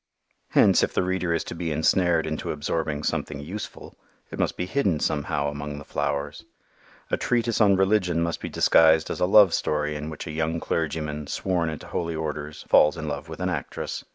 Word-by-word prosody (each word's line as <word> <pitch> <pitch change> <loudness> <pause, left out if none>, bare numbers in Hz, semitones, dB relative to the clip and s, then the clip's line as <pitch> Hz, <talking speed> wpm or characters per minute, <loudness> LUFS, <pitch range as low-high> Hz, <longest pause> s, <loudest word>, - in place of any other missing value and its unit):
Hence - - +5
if - - -1
the - - +2
reader 90 -1 -1
is 85 - 0
to - - -7
be 85 -1 -3
ensnared 80 +2 +2
into 80 0 -3
absorbing 75 0 -2
something 70 - -2
useful, 90 +9 -7 0.4
it - - -7
must - - 0
be 90 - -2
hidden 95 - 0
somehow 70 -1 -1
among 75 0 -6
the 75 - -9
flowers. 70 0 -3 0.7
A - - +2
treatise 120 -2 0
on 100 -2 +5
religion 95 -3 +2
must 85 0 -3
be - - -4
disguised 80 -1 +4
as - - -4
a 90 - +2
love 100 -2 +7
story 75 0 -1
in 75 +1 -5
which 80 - -7
a - - -5
young 80 +1 -1
clergyman, 75 -3 -3
sworn 90 -4 -1
into 80 - -7
holy 85 -2 -3
orders, 75 -1 -5
falls 75 +2 +5
in 80 -1 -5
love 75 +2 -5
with 80 - -8
an 90 0 -1
actress. 80 -6 -4
80 Hz, 195 wpm, -25 LUFS, 75-90 Hz, 0.7 s, love